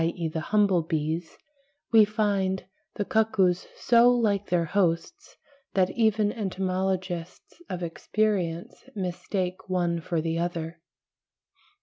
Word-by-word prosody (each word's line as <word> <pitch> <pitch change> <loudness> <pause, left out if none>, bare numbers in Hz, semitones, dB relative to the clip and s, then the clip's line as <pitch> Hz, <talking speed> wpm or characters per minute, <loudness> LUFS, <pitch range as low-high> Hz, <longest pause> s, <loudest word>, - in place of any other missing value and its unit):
e. 165 0 -1
the 160 +1 -3
humble 200 -4 +4
bees) 160 +1 -3 0.5
we 225 -2 +8
find 200 -3 0 0.3
the 205 - -2
cuckoos 195 -5 +2
so 240 0 +5
like 210 -5 +2
their 175 -2 +2
hosts 195 - -1 0.4
(pl. 190 -1 +5
D, 180 - -7
30, - - -11
31) - - -19
that - - -9
even 215 -1 +3
entomologists 185 - -3
of 180 -1 -4
experience 175 -1 -1
mistake 185 0 -3
one 175 -2 0
for 170 -1 -1
the 165 +1 -1
other. 170 -1 -3
185 Hz, 130 wpm, -27 LUFS, 170-205 Hz, 0.5 s, we